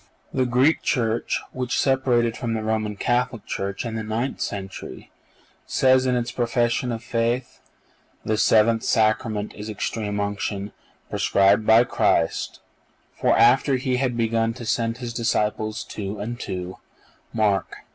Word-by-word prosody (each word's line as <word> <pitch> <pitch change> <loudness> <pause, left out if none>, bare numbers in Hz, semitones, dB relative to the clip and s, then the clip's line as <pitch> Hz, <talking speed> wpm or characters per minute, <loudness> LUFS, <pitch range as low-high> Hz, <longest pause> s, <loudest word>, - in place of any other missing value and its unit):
(487) - - -3
The 125 -1 0
Greek 130 +6 +3
Church, 115 -2 0
which 125 -1 -2
separated 125 -4 +2
from 115 -3 -3
the 110 - -3
Roman 110 -1 -1
Catholic 120 0 -1
Church 100 +3 -3
in 115 - -4
the 110 - -3
ninth 115 +5 -3
century, 95 -1 -6 0.6
says 130 0 +3
in 125 - +2
its 120 0 -1
profession 120 0 0
of 115 0 -5
faith: 120 +1 -1 0.7
"The 110 - +1
seventh 115 +1 +4
Sacrament 110 -2 +1
is 105 +1 -7
Extreme 105 0 -3
Unction, 100 0 -3 0.4
prescribed 100 +2 +3
by 110 +2 +7
Christ; - - 0 0.5
for, - - +2
after 130 +3 +5
He 130 0 0
had 125 -2 -1
begun 115 0 +1
to 125 -2 -8
send 115 +1 0
His 120 -2 -6
disciples 110 -2 -1
two 100 0 -6
and 120 +4 -5
two 90 -3 -5 0.5
(Mark 105 -4 +1
vi. - - -10
115 Hz, 145 wpm, -23 LUFS, 105-125 Hz, 0.7 s, by